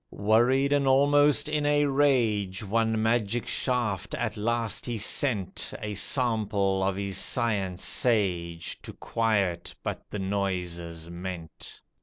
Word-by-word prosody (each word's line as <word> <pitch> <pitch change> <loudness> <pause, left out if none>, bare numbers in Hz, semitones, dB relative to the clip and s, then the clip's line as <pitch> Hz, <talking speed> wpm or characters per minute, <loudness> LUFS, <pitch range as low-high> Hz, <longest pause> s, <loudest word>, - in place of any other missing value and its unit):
Worried 120 +7 +2
and 140 -1 +2
almost 145 +2 +4
in 150 -1 -1
a 145 0 +2
rage, 115 -9 +1
One 110 +1 0
magic 115 0 0
shaft 120 -7 -1
at - - -3
last 115 0 -1
he 120 -2 -2
sent, 105 -1 +1
A 105 -1 -5
sample 105 -4 +1
of 95 0 0
his 100 -1 -2
science 100 -7 0
sage, 90 -8 +1
To - - -9
quiet 100 -7 -1
but - - -4
the - - -5
noises 90 -4 -3
meant. 85 -2 -8
105 Hz, 125 wpm, -27 LUFS, 95-125 Hz, -, almost